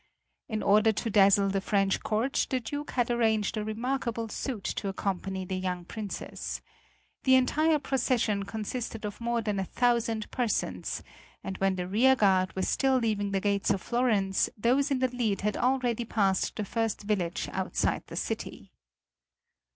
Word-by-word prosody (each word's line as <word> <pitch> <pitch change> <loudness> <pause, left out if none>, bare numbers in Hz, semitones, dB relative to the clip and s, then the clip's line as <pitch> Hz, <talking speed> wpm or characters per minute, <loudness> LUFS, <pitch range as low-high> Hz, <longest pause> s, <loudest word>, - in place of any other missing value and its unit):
In 215 -2 -2
order 215 +2 +5
to 220 +2 -3
dazzle 200 -1 +5
the 195 0 0
French 195 -1 +1
court 225 +5 0
the 260 - +1
Duke 290 +4 -5
had 245 -1 0
arranged 220 -3 +1
a 215 - -2
remarkable 230 +1 -2
suite 230 -3 -4
to 200 - -3
accompany 190 -1 -3
the 185 +1 -3
young 180 -1 -3
Princess. 170 - -5 0.6
The 260 - +6
entire 305 +5 +3
procession 245 -7 0
consisted 220 +1 -4
of 205 +2 -6
more 235 0 0
than 205 -2 -1
a - - 0
thousand 230 -1 0
persons, 245 -4 -2 0.4
and 190 - -5
when 195 0 +2
the 180 -1 -3
rear 245 +8 +4
guard 190 -5 +2
were 190 - -1
still 265 +4 +2
leaving 215 -4 0
the 195 -1 0
gate 200 0 0
of 200 -1 +2
Florence 215 -6 +1
those 255 +7 +2
in 275 - +1
the 255 0 +2
lead 220 -5 0
had 210 +1 0
already 245 -2 +1
passed 195 -4 +1
the 210 - -3
first 225 0 -2
village 190 -5 -1
outside - - -1
the - - -8
city. - - -4
215 Hz, 165 wpm, -29 LUFS, 195-245 Hz, 0.6 s, The